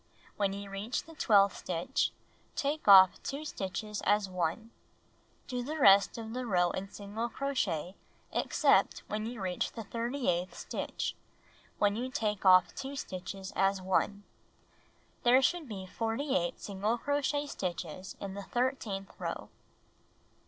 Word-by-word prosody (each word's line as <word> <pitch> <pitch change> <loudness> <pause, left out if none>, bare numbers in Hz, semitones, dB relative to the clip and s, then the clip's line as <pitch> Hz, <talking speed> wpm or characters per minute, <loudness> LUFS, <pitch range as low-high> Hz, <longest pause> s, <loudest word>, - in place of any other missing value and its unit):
When 200 -2 0
you 200 0 -6
reach 205 +5 -3
the 325 - -13
twelfth 200 -9 +4
stitch, 185 +10 -1 0.5
take 290 0 -2
off 190 -2 +8
2 285 +3 -5
stitches 205 -3 -4
as 205 0 +3
one. 185 +5 -2 0.7
Do 250 -2 -3
the 300 +6 -4
rest 200 -7 +6
of 225 -1 -6
the 250 0 -3
row 180 -4 +3
iii 190 +1 -4
single 205 +4 -5
crochet 210 - -1 0.4
except - - +2
when 215 +1 -3
you 240 -1 -6
reach 185 -2 -2
the 225 - -6
tliii'ty 235 +5 -3
eighth 180 +1 0
stitch, - - -3 0.6
when 205 -1 +2
you 250 +3 -3
take 210 -5 -1
off 185 0 +7
2 270 +1 -6
stitches 190 -3 -6
as 195 0 +2
one. 190 +2 0 1.0
There 245 +2 +6
should 320 +1 0
be 195 -3 -6
48 225 - -1
single 205 +3 -1
crochet 285 +2 0
stitches 185 - -5
in 195 -1 -5
the 200 - -5
thirteenth 225 -4 -2
row. - - -4
205 Hz, 140 wpm, -31 LUFS, 190-250 Hz, 1.0 s, off